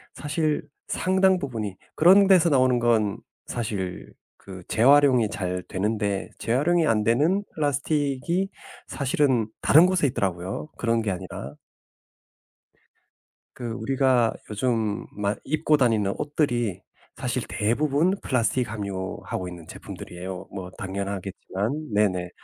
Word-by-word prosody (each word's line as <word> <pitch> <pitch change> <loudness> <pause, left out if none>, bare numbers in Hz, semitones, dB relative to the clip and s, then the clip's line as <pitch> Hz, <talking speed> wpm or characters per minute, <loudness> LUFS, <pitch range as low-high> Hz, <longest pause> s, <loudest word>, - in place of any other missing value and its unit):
사실 150 0 -1 0.2
상당 190 0 +2
부분이 110 - -4 0.2
그런 190 +5 +7
데서 180 -3 +5
나오는 130 -3 +3
건 110 -4 +2 0.3
사실 100 -6 -4 0.3
그 95 -2 -11
재활용이 130 -2 +5
잘 90 -1 -3
되는데 100 0 -2
재활용이 155 +7 +2
안 105 -1 +2
되는 155 - +2
플라스틱이 145 +4 0 0.4
사실은 130 -4 +1
다른 160 +4 +7
곳에 185 -6 +2
있더라고요 95 - -3
그런 115 -1 +1
게 100 - -1
아니라. 70 -6 -6 2.0
그 120 -2 -5
우리가 125 0 +2 0.2
요즘 110 0 -1
만 105 0 -1
입고 155 +1 +2
다니는 110 -7 +2
옷들이 120 - -1 0.3
사실 - - -2
대부분 145 - +1
플라스틱 125 -1 0
함유하고 95 -3 -4
있는 85 -2 -10
제품들이에요 90 +1 -8
뭐 95 -2 -6
당연하겠지만. 100 +6 -4
네네. 95 -4 +1
115 Hz, 270 characters per minute, -25 LUFS, 100-145 Hz, 2.0 s, 그런